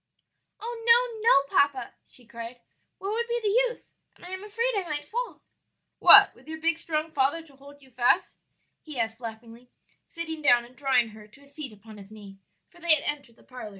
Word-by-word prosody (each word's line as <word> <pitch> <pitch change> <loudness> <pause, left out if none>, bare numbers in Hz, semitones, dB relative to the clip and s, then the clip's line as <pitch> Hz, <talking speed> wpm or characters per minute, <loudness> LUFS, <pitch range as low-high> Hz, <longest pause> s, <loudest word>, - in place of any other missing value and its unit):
"Oh 460 0 -7
no, 470 -1 +4
no, 280 - +3
papa!" 285 -2 +1
she 245 - -17
cried, 235 +1 -9 0.4
"what 395 +2 -5
would 470 +2 -2
be 475 0 -1
the 420 - +1 0.2
use? 485 - -13 0.2
and - - -16
I - - -9
am 375 +1 -6
afraid 460 +4 -2
I 400 - 0
might 295 -1 -3
fall." 480 +9 -5 0.6
"What, - - +9
with - - -22
your 315 0 -7
big 330 +1 0
strong 315 -1 -3
father 290 +3 0
to 290 -4 -20
hold 285 +1 -16
you 265 - -20
fast?" 245 0 +1 0.4
he 300 -5 -8
asked 225 0 -2
laughingly, 230 +1 -10 0.4
sitting 325 -2 -4
down 245 -5 +4
and 245 +1 -19
drawing 260 -5 +1
her 215 -1 -14
to 215 +6 -20
a - - -20
seat 285 -2 -9
upon 210 0 -14
his 195 0 -14
knee; 205 -2 -13 0.3
for 350 - -21
they 335 -2 +7
had 290 - -4
entered 285 -6 -5
the - - -23
parlor. 250 -4 -10
285 Hz, 210 wpm, -26 LUFS, 235-340 Hz, 0.6 s, What